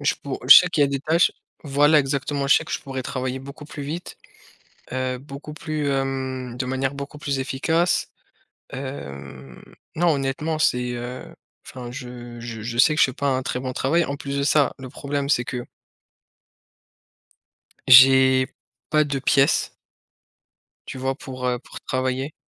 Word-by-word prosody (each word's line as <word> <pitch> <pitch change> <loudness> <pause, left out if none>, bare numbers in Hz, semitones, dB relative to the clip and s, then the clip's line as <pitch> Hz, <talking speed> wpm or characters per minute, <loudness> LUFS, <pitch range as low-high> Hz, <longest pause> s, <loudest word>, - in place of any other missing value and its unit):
je 145 - +1
pou 140 -2 -4
je - - +13
sais 180 - +6
qu'il 160 -4 +1
y - - +6
a - - 0
des 140 -1 -2
tâches 160 +4 +3 0.3
voilà, 145 +2 +4
exactement, 140 0 -1
je 140 - +6
sais - - +2
que - - -11
je - - 0
pourrais 135 -2 -5
travailler 130 0 -4
beaucoup 140 +2 -10
plus 145 -1 -8
vite, 160 +5 -6 0.8
heu, 130 -1 -2
beaucoup 140 +3 -10
plus, 155 -1 -3
hem, 130 -2 -3
de 130 - -2
manière 130 +1 -2
beaucoup 140 +1 -7
plus 140 -2 -2
efficace, 160 +7 0 0.6
hem, 70 - -8 0.4
non 175 +2 +2
honnêtement 145 +3 -2
c'est, 125 -4 +1
heu 120 +1 -6 0.4
enfin 125 -2 -8
je 120 -2 -9
je 115 -2 -7
je 115 +2 -5
sais 155 +5 +5
que - - -2
je - - +8
fais 130 - -5
pas 140 +1 -2
un 130 -1 +1
très 125 - -3
bon 130 -1 -4
travail 165 +7 +1
en 140 - -4
plus 140 0 -5
de 140 - 0
ça 145 -1 +3
le 130 - -8
problème 140 +1 -3
c'est 125 -4 +2
que 125 0 -5 2.2
j'ai 130 0 +7 0.4
pas 155 -1 +4
de 140 -2 -2
pièce 135 +2 +2 1.2
tu - - -6
vois? 130 +1 -1
Pour, 130 -3 -6
heu, 125 -1 0
pour - - -11
travailler 130 +3 -2
135 Hz, 175 wpm, -23 LUFS, 130-145 Hz, 2.2 s, je